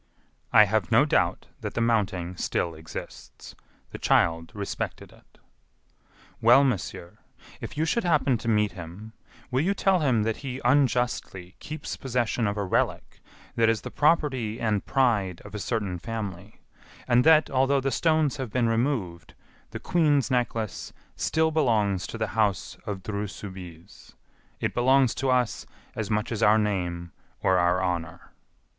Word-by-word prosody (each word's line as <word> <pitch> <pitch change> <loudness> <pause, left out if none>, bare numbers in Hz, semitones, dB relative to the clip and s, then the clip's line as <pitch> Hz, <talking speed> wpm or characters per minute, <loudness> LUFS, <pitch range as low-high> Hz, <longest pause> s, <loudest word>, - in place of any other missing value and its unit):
"I 110 - +8
have 105 -4 0
no - - +5
doubt - - +1
that - - -6
the - - 0
mounting 100 -6 0
still 85 -1 -2
exists. 80 0 -10 0.4
The - - -8
child 85 0 +2
respected 100 -1 -5
it." - - -23 1.0
"Well, 120 +5 +7
monsieur, 100 -8 -3 0.4
if - - -8
you 155 - +1
should 235 +8 0
happen 150 -8 +2
to 115 - -7
meet 105 -2 +2
him, 90 +5 -10 0.4
will 130 +2 +2
you 195 +5 +1
tell 190 -2 +2
him 130 -8 +2
that 110 0 -1
he 130 -2 -6
unjustly 125 -8 0
keeps 155 +1 -6
possession 120 -3 -1
of 100 +1 -2
a 100 - -1
relic 95 - -1 0.4
that 115 -1 +3
is 115 -3 0
the - - -7
property 135 -8 +1
and 105 -3 0
pride 105 -9 +1
of 105 - -11
a 105 - -4
certain 100 -3 -2
family, 100 -1 -6 0.5
and 125 0 +4
that, 155 0 +5
although 135 +1 +2
the 135 0 -1
stones 155 -3 +1
have 130 -4 -4
been 120 0 +1
removed, 115 - -2 0.3
the - - -7
Queen's 150 -6 +2
necklace 115 -4 -2 0.2
still 160 0 +1
belongs 110 - +1
to - - -7
the 110 -2 -2
house 105 -4 0
of 100 -3 -4
Dreux 105 -1 -3
Soubise. 95 -3 -11 0.4
It - - -2
belongs 130 0 +3
to 135 0 -2
us 125 -3 0 0.3
as 110 -2 -3
much 105 +1 -1
as 115 -1 -3
our 110 0 +5
name 90 -5 -2 0.3
or 95 -1 +3
our 90 +1 +2
honor." 85 -3 -4
110 Hz, 155 wpm, -26 LUFS, 95-130 Hz, 1.0 s, I